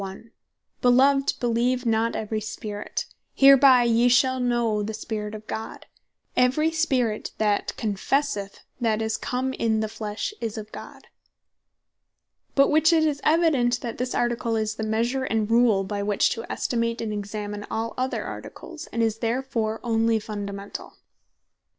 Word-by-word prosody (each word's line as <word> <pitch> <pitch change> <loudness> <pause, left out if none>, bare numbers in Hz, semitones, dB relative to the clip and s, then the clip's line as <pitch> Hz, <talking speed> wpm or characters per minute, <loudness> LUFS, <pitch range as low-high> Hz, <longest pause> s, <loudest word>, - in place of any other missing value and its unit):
"Beloved, 270 +3 +4
beleeve 245 +1 0
not 225 0 +1
every 215 0 -3
spirit. 210 -1 -5 0.3
Hereby 270 -2 +7
yee 235 +1 +3
shall 260 +1 +3
know 240 -4 +1
the 215 +1 -4
Spirit 210 -1 -5
of 215 0 -10
God; 220 0 -6 0.5
every 265 +6 +3
spirit 265 -9 0
that 210 -2 0
confesseth 210 0 -1 0.2
that 225 -3 +1
Jesus 220 0 -1
Christ - - -13
is - - -4
come 260 0 -1
in 220 -3 0
the 220 - -1
flesh, 215 - -4
is 225 -2 -3
of 215 0 -7
God." - - -10 1.5
By 275 - +6
which 310 +3 +4
it 320 -1 +4
is 290 -2 -1
evident, 285 -7 +3
that 235 -2 -5
this 250 0 -2
Article, 240 -1 0
is 215 -1 -1
the 220 - -7
measure, 235 +5 0
and 220 -2 -1
rule, 230 -4 +4
by 200 +1 -3
which 205 0 +2
to 230 -1 -5
estimate, 230 -1 -1
and 220 -2 -3
examine 205 0 -5
all 225 +1 -3
other 255 +1 -2
Articles; 325 -2 -8
and 230 0 -1
is 225 -1 0
therefore 230 -2 -1
onely 225 -1 +2
Fundamentall. 200 -2 -6
230 Hz, 150 wpm, -25 LUFS, 215-255 Hz, 1.5 s, Hereby